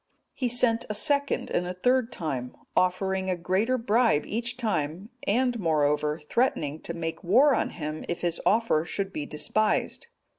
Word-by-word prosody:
He 255 - -1
sent 235 -1 +2
a 210 - -1
second 280 +6 +1
and 180 - 0
a 180 - -4
third 250 +5 +2
time, 135 - -4 0.2
offering 190 +1 +1
a 185 - +1
greater 190 +9 0
bribe 230 -7 +2
each 235 +3 -3
time, 195 - -2 0.2
and, 245 +3 +1
moreover, 150 -3 +1
threatening 155 - -1
to 170 - -5
make 165 +1 -4
war 255 +11 +5
on - - 0
him 155 -1 -5
if 175 - -3
his 175 -1 -1
offer 220 -8 +2
should 195 +3 -3
be 150 -3 -4
despised. 215 - -1
190 Hz, 160 wpm, -27 LUFS, 165-235 Hz, 0.2 s, war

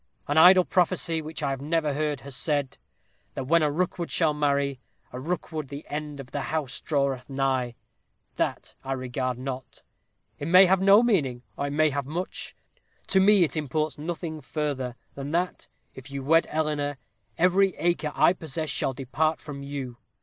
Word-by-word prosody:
An 145 - 0
idle 180 +3 +8
prophecy 170 -3 +1
which 155 -1 -6
I 140 - +1
have 135 - -3
heard 150 -2 0
has 140 -1 -8
said 145 -3 -1 0.6
"that - - -3
when 165 +6 +3
a 150 - +3
Rookwood 175 +1 -2
shall 160 -3 +2
marry 140 -2 0 0.3
a 125 - -5
Rookwood 155 0 -3
the 140 +2 -8
end 150 -1 -5
of 135 -2 -9
the 145 - -2
house 150 -2 -3
draweth 140 -4 -1
nigh." 135 -3 0 0.6
That - - -2
I 135 - -2
regard 130 -1 -3
not. 130 0 -7 0.6
It 145 - -4
may 185 +3 +8
have 190 +1 +3
no 200 +4 +7
meaning, 140 - +1
or 140 - -2
it 140 - -4
may 155 0 +3
have 140 -1 -3
much. 175 +5 -5 0.5
To 190 - +4
me 200 -1 +6
it 165 - -1
imports 155 0 -2
nothing 160 0 -4
further, 135 -4 -3 0.2
than 140 0 -6
that, 180 +2 -1 0.3
if 130 +1 -11
you 140 -1 -5
wed 165 +4 +4
Eleanor, 150 -2 -1 0.4
every 185 +2 +3
acre 170 -3 0
I - - +5
possess 160 -2 -5
shall 130 +1 0
depart 150 +4 0
from 145 -2 -8
you. 140 -3 -6
150 Hz, 170 wpm, -26 LUFS, 135-165 Hz, 0.6 s, idle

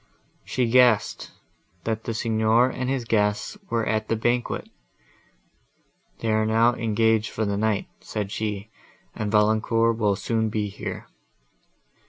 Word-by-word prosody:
She 125 - -1
guessed, 120 -2 +3 0.5
that 110 -1 -3
the 115 - -3
Signor 115 +2 +2
and 130 0 -3
his 135 -3 -1
guests 105 - 0
were 115 -1 0
at 110 -1 -1
the 115 - +1
banquet. 120 +2 -1 1.5
"They 115 - 0
are 110 0 +2
now 115 +2 +3
engaged 110 -1 +1
for 110 - -2
the 100 -1 -1
night," 105 -1 0
said 105 -2 -5
she; 105 0 -4 0.4
"and 105 -2 -3
Valancourt 110 +2 +2
will 105 -3 +2
soon 110 +2 -1
be 105 -1 -2
here." 100 - -6
110 Hz, 135 wpm, -24 LUFS, 105-115 Hz, 1.5 s, guessed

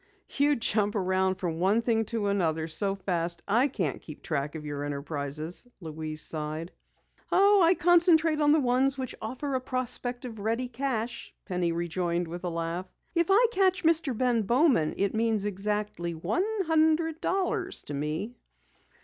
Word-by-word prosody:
"You 290 +1 +3
jump 210 -3 +1
around 190 -1 +1
from 170 -3 -3
one 200 +6 +2
thing 225 -1 +1
to 220 -1 -2
another 165 -6 0
so 195 +5 0
fast 170 -3 -2
I 235 +7 +4
can't 180 - -3
keep 155 - -11
track 150 -2 -2
of 155 -1 -7
your 145 -1 -4
enterprises," 145 - -4
Louise 155 -2 -5
sighed. 155 +2 -4 0.6
"I 390 -3 +5
concentrate 330 -2 +4
on 295 0 +4
the 310 - +5
ones 265 +1 +2
which 260 -2 -4
offer 260 +5 -4
a 260 - 0
prospect 250 -1 0
of 225 -3 -7
ready 230 +4 -1
cash," 235 -2 -3
Penny 180 -3 -1
rejoined 170 +1 -1
with 175 +2 -7
a 180 - -1
laugh. 170 +2 -3 0.3
"If 340 -2 +2
I 420 +6 +6
catch 375 -2 +2
Mr. 320 -7 +2
Ben 245 -2 +2
Bowman 240 - +2
it 200 -1 0
means 220 -2 0
exactly 205 -3 -2
one 205 - -1 0.2
hundred 320 0 +2
dollars 375 -1 -1
to 145 - -6
me!" 155 +10 -3
210 Hz, 160 wpm, -28 LUFS, 170-275 Hz, 0.6 s, I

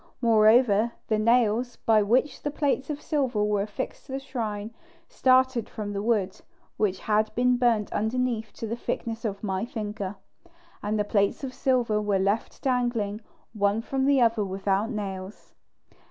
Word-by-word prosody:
Moreover, 225 -1 +4 0.2
the 215 -1 +2
nails 235 +1 +2
by 220 -1 +3
which 245 +8 +1
the 290 - -2
plates 285 -2 -1
of 295 -1 -3
silver 265 -9 0
were 210 -1 +1
affixed 205 +5 -5
to 265 - -7
the 270 - -2
shrine 225 -5 -4 0.3
started 260 -3 +2
from 205 -1 -5
the 200 - -2
wood, 205 -4 0 0.4
which 195 -3 +1
had 215 0 +1
been 250 +1 +3
burnt 235 -4 +1
underneath 225 0 -1
to - - -6
the 225 +1 -3
thickness 230 -1 -4
of 200 -1 -3
my 190 -1 -1
finger, 210 -4 -4 0.7
and 210 +1 -1
the 210 - +2
plates 205 +3 0
of 260 -1 -4
silver 245 -5 +1
were 205 -2 +1
left 200 +4 -1
dangling 240 -5 0 0.3
one 205 0 +1
from 265 +3 -1
the 280 -1 +4
other 230 -3 +3
without 195 +2 -1
nails. 195 -3 -6
220 Hz, 160 wpm, -26 LUFS, 205-245 Hz, 0.7 s, Moreover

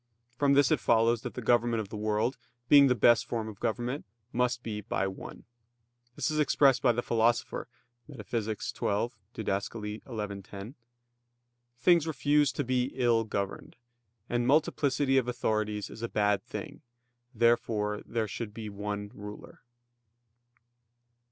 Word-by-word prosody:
From 140 +2 +3
this 140 -2 +4
it - - +3
follows 115 0 +3
that - - -6
the 125 - -5
government 120 0 +2
of 105 -3 -4
the 110 - -7
world, 110 +4 0 0.3
being 140 0 +8
the 125 - +3
best 120 0 +4
form 115 -2 -2
of 105 -3 -9
government, 120 +5 -2 0.3
must 125 0 0
be 105 -2 -4
by 95 - -1
one. 95 0 -7 0.7
This - - -1
is 155 - -1
expressed 140 -3 +4
by 125 - +4
the 120 +1 -2
Philosopher 115 +1 +1 0.4
(Metaph. 115 -4 -3 0.7
xii, 110 -4 -34
Did. 100 -3 -1
xi, 105 -2 -6
10): 100 +6 -9 1.0
"Things 165 +4 +4
refuse 145 -2 +2
to 145 - -2
be 125 -1 +1
ill 120 -3 +2
governed; 100 -2 -4 0.5
and 120 0 0
multiplicity 140 -2 +3
of 125 - -3
authorities 110 -3 -1
is 110 - -10
a 115 - -3
bad 105 -1 +1
thing, - - -8 0.5
therefore 110 -2 +1
there 115 -2 -2
should 105 +1 -6
be 110 -1 -6
one 105 0 -5
ruler." 105 0 -10
115 Hz, 145 wpm, -29 LUFS, 105-125 Hz, 1.0 s, being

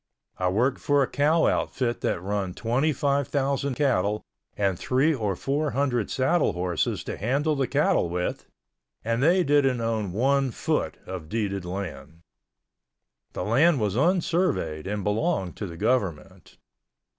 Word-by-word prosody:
I 90 - +1
worked 125 +8 +1
for 145 -1 +2
a - - -1
cow 155 +3 +2
outfit 120 -2 0
that 85 - -1
run 95 -2 -2
twenty 125 +7 +1
five 140 -2 0
thousand 140 -1 -1
cattle 105 -7 +1 0.3
and 100 -3 0
three 135 +5 +2
or 105 -8 -1
four 145 - -1
hundred 125 -6 0
saddle 140 - +1
horses 90 -1 -1
to - - -5
handle 140 +8 0
the 135 -2 0
cattle 85 - +2
with, 90 +1 -3 0.6
and 115 +1 0
they 175 +5 +4
didn't 140 -4 +3
own 110 -4 -1
one 135 +6 +2
foot 115 - -2
of 90 -4 -7
deeded 100 -4 -2
land. 85 -4 -6 1.1
The - - -3
land 140 +8 +3
was 105 -2 0
unsurveyed 165 - +1
and 105 0 -3
belonged 105 - -1
to 105 - -4
the 85 -2 -9
government. 100 -7 -2
120 Hz, 145 wpm, -26 LUFS, 95-140 Hz, 1.1 s, they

